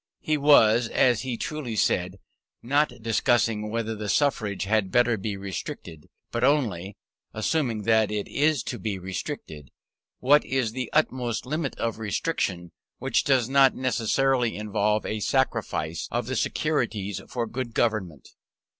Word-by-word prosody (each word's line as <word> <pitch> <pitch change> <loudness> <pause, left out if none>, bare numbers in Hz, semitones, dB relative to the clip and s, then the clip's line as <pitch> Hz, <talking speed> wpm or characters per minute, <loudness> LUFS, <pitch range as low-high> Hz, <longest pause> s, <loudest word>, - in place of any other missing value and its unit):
He 155 - 0
was, 120 -6 +5
as 120 -1 +2
he 125 -3 -3
truly 145 -6 -4
said, 90 -2 0 0.5
not 145 +5 +2
discussing 115 -1 +1
whether 115 0 -2
the 105 -1 -5
suffrage 110 -9 +1
had 100 0 +1
better 120 +1 +3
be 100 0 -4
restricted, 95 -5 -7 0.2
but 120 0 -2
only 105 - +1 0.4
(assuming 115 -1 -1
that 110 -1 +3
it 105 -1 -3
is 150 -2 +1
to 120 - -5
be 100 +1 -3
restricted) 90 -6 -6 0.5
what 145 +3 +4
is 130 -4 -1
the 125 0 -4
utmost 125 -7 0
limit 150 +1 -3
of 115 -1 -2
restriction 100 - -2 0.3
which - - 0
does 130 -4 +2
not 135 0 +5
necessarily 130 0 +1
involve 105 0 0
a 110 - -2
sacrifice 80 -5 -1
of 120 +1 -2
the 130 +3 -3
securities 115 -8 -1
for 120 -2 -2
good 120 0 -5
government. 95 - -1
115 Hz, 140 wpm, -26 LUFS, 105-130 Hz, 0.5 s, was